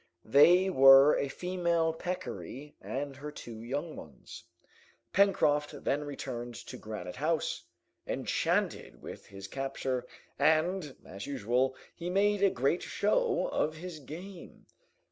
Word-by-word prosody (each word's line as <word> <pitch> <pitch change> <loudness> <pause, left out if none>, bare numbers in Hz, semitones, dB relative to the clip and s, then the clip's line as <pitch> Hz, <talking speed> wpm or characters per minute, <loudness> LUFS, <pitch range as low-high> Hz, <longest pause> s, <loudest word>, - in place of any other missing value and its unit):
They 175 +10 +6
were 135 -3 +8
a 140 - 0
female 170 0 0
peccary 160 -5 -6
and 140 0 -4
her 150 +1 -7
two 115 -6 -9
young 145 +7 -4
ones. 70 -5 -11 0.7
Pencroft 150 -7 +2
then 145 +2 0
returned 120 -4 -6
to 120 +1 -9
Granite 105 -4 -7
House, 155 +3 -1 0.4
enchanted - - -1
with - - -9
his 100 0 -9
capture, 130 0 -3 0.3
and, 160 -1 +2
as 100 +1 -8
usual, 130 0 0 0.2
he 175 +1 -5
made 200 +2 +2
a 200 - +6
great 140 +4 0
show - - +1
of 155 - 0
his 170 0 -8
game. 175 +6 -10
145 Hz, 125 wpm, -31 LUFS, 130-175 Hz, 0.7 s, were